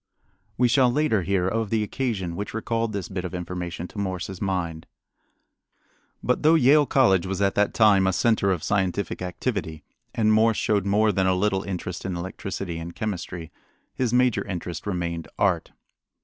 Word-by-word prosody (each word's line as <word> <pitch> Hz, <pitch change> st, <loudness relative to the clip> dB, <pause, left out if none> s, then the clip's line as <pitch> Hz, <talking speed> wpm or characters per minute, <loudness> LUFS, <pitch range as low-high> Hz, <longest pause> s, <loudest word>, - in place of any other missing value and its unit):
We 125 Hz, -, +4 dB
shall 125 Hz, 0 st, +4 dB
later 140 Hz, -6 st, +2 dB
hear 90 Hz, 0 st, 0 dB
of 110 Hz, +2 st, -1 dB
the 110 Hz, 0 st, +1 dB
occasion 105 Hz, -7 st, -2 dB
which 105 Hz, +3 st, -5 dB
recalled 115 Hz, 0 st, -1 dB
this 100 Hz, -4 st, -4 dB
bit 95 Hz, -2 st, -4 dB
of 90 Hz, 0 st, -5 dB
information 90 Hz, 0 st, -5 dB
to 105 Hz, -, -8 dB
Morse's 95 Hz, -1 st, -4 dB
mind. 85 Hz, -5 st, -2 dB, 1.4 s
But 125 Hz, -, +1 dB
though 155 Hz, +2 st, +5 dB
Yale 145 Hz, 0 st, +5 dB
College 95 Hz, -9 st, +3 dB
was 95 Hz, 0 st, -3 dB
at 100 Hz, -1 st, +2 dB
that 105 Hz, 0 st, +1 dB
time 100 Hz, -4 st, +5 dB
a 95 Hz, -, +2 dB
center 100 Hz, +1 st, +2 dB
of 90 Hz, -5 st, -2 dB
scientific 95 Hz, -1 st, -1 dB
activity, 90 Hz, -, -3 dB, 0.3 s
and 110 Hz, -1 st, +3 dB
Morse 110 Hz, 0 st, +4 dB
showed 100 Hz, -2 st, +1 dB
more 105 Hz, +2 st, +3 dB
than 95 Hz, -2 st, +1 dB
a 95 Hz, -, +3 dB
little 95 Hz, 0 st, +1 dB
interest 90 Hz, -2 st, -5 dB
in 95 Hz, -2 st, -3 dB
electricity 95 Hz, -1 st, -5 dB
and 85 Hz, +1 st, -7 dB
chemistry, 90 Hz, -5 st, -5 dB, 0.4 s
his 125 Hz, -3 st, -1 dB
major 125 Hz, -1 st, +3 dB
interest 85 Hz, -1 st, -5 dB
remained 85 Hz, -4 st, -3 dB
art. -, -, +1 dB
95 Hz, 170 wpm, -25 LUFS, 90-110 Hz, 1.4 s, though